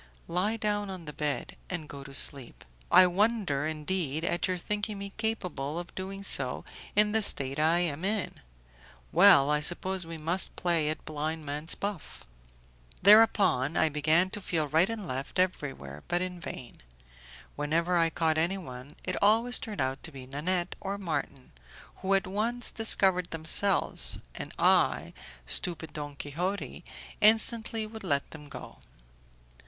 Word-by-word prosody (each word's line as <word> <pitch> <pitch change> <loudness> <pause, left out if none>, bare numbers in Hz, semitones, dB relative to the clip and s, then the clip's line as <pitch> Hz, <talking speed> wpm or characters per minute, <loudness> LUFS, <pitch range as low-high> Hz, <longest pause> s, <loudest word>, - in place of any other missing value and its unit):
"Lie 190 +6 -1
down 205 -2 -1
on 185 -3 -8
the 150 - -7
bed, 150 -1 -3
and 175 -4 -5
go 140 -2 -9
to 135 0 -8
sleep." 135 -3 +2 0.3
"In 180 0 +7
wonder, 195 -8 +1
indeed, 155 0 -2
at 175 - 0
your 185 -1 -1
thinking 210 +3 -3
me 200 0 -7
capable 180 - -3
of 175 0 -7
doing 195 +1 -6
so - - 0 0.3
in 210 0 +4
the 220 +1 +2
state 135 -8 -1
I 165 +3 +3
am 165 -2 -2
in. 205 0 -1 0.7
Well, 140 +1 +7
I 150 - +2
suppose 180 +3 +1
we 165 0 -6
must 165 +4 +1
play 170 -4 +1
at 155 - -4
blind 155 +1 -4
man's 150 +3 -1
buff." 200 -5 -6 0.8
Thereupon, 195 - +5
I 160 - +3
began 155 +5 +2
to 205 - -4
feel 165 -6 -1
right 160 +7 +3
and 220 -4 -5
left, 135 0 -5
everywhere, 135 - -2
but 175 0 0
in 180 -1 -6
vain. 125 -7 -9 0.7
Whenever 165 +4 0
I 165 -1 +3
caught 160 -1 0
anyone 160 -7 -4
it - - -3
always 230 +4 +4
turned 215 - -5
out 130 +1 -2
to 165 - -8
be 135 -3 -10
Nanette 175 +7 -2
or 200 0 -4
Marton, 145 -8 -4 0.5
who 195 +1 +1
at 195 - +1
once 225 +6 -1
discovered 190 -5 +3
themselves, 165 +4 +1 0.2
and - - -7
I, - - +2 0.3
stupid 165 - -1
Don 145 -1 -6
Quixote, 175 +8 -4 0.4
instantly 220 +1 +3
would 220 0 -9
let 140 -7 -1
them 150 -2 -11
go! - - -10
175 Hz, 155 wpm, -29 LUFS, 150-195 Hz, 0.8 s, In